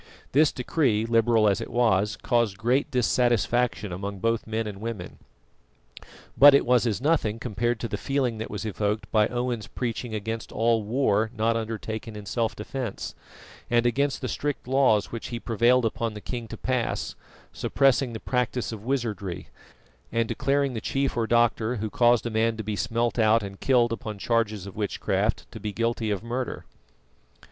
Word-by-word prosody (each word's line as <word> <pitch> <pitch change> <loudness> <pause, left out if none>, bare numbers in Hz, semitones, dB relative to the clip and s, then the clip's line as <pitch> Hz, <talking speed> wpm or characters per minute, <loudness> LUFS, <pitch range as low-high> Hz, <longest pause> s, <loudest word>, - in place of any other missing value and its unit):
This 150 +2 +4
decree, 125 -4 +1
liberal 115 -1 +3
as 100 - +2
it - - -5
was, 105 -4 +2
caused 115 -6 +1
great 130 +7 +1
dissatisfaction 120 -4 +1
among 100 +3 -5
both 115 +3 -1
men 110 +1 -2
and 100 -2 -7
women. 110 -6 -6 1.2
But 145 0 +9
it - - +3
was 125 -1 +3
as 110 - 0
nothing 140 -8 +1
compared 120 0 -1
to 115 - -2
the - - -4
feeling 130 -5 -1
that 110 - -4
was 105 +1 -5
evoked 105 0 -2
by 110 -1 +4
Owen's 120 -2 -2
preaching 120 -2 -4
against 110 +2 -4
all 115 0 +2
war 110 -1 +1
not 115 +1 +2
undertaken 110 0 -4
in 105 -1 -8
self 115 +2 -1
defence, 115 0 -5 0.6
and 120 0 +3
against 140 +4 +1
the - - -2
strict 145 -3 -3
laws 130 -6 +3
which 115 - -5
he 120 - -4
prevailed 120 +2 +3
upon 115 0 -2
the - - -6
king 120 +1 -5
to - - -8
pass, 125 -2 -1 0.4
suppressing 135 -2 +2
the 110 - -5
practice 125 -1 -1
of 110 -2 -7
wizardry, 110 -8 -3 0.6
and 115 0 +1
declaring 140 +2 0
the 110 - -4
chief 135 +3 -1
or 115 -2 0
doctor 120 0 +2
who 110 -1 -3
caused 120 -1 +3
a 120 - -2
man 110 +1 +1
to 110 - -4
be 105 0 -3
"smelt 115 +3 -1
out" 110 0 +4
and 100 -1 -8
killed 120 -3 +3
upon 110 -2 -5
charges 110 -2 0
of 100 - -9
witchcraft 105 -2 -1
to - - -8
be 105 - -4
guilty 115 0 -1
of 105 -1 -2
murder. 120 +2 -4
115 Hz, 175 wpm, -26 LUFS, 110-125 Hz, 1.2 s, But